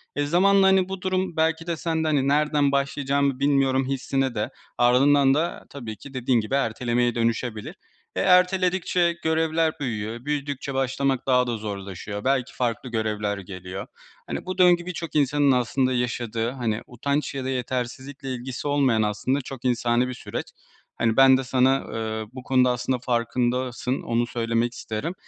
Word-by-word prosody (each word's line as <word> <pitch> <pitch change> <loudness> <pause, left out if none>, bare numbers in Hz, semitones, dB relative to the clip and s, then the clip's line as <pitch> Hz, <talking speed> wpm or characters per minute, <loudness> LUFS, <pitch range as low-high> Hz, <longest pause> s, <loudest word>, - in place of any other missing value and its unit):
Eee, 145 - 0
zamanla, 190 +5 +4
hani, 190 -1 +3
bu 190 0 -5
durum 185 -3 -1
belki 160 +1 +1
de 170 -2 -1
sen 160 -1 -1
de, - - 0
hani, 140 -3 +2
"nereden 145 -1 +2
başlayacağımı 140 -1 0
bilmiyorum." 135 -2 +2
hissine 135 -1 -1
de, 105 +1 -1 0.3
ardından 135 +3 +5
da 160 +4 -1
tabii 115 -6 -7
ki 140 - -12
dediğin 125 -1 +1
gibi 110 +5 -2
ertelemeye 120 -1 0
dönüşebilir. 115 -1 -2 0.4
Eee, - - 0
erteledikçe 180 -2 +3
görevler 160 0 +1
büyüyor, 115 -2 -4
büyüdükçe 145 -2 -3
başlamak 135 0 0
daha 125 -1 +3
da 120 -1 -2
zorlaşıyor. 100 -1 -6
Belki 130 -1 0
farklı 120 +1 -2
görevler 105 -3 -1
geliyor. 95 0 -7 0.4
Hani, - - -5
bu 185 - -4
döngü 175 -1 +5
birçok 170 -3 -6
insanın 145 0 +3
aslında 130 +1 +1
yaşadığı, 120 -2 -1
hani, 115 -4 -2
utanç 140 +4 -2
ya 130 -1 -3
da - - -2
yetersizlikle 130 +2 -4
ilgisi 125 +3 -5
olmayan 135 -6 +2
aslında 105 +6 0
çok 130 -1 -9
insani 120 0 +2
bir 125 - -4
süreç. 125 - -5 0.5
Hani, 115 0 +1
ben 135 -1 +7
de 130 - -2
sana, 130 +1 +3
ııı, 110 -1 -4
bu 130 -1 -8
konuda 125 -1 +3
aslında 125 +1 -1
farkındasın, 125 +1 -1
onu 120 0 0
söylemek 115 0 -1
isterim. 115 +10 -4
130 Hz, 160 wpm, -24 LUFS, 120-145 Hz, 0.5 s, ben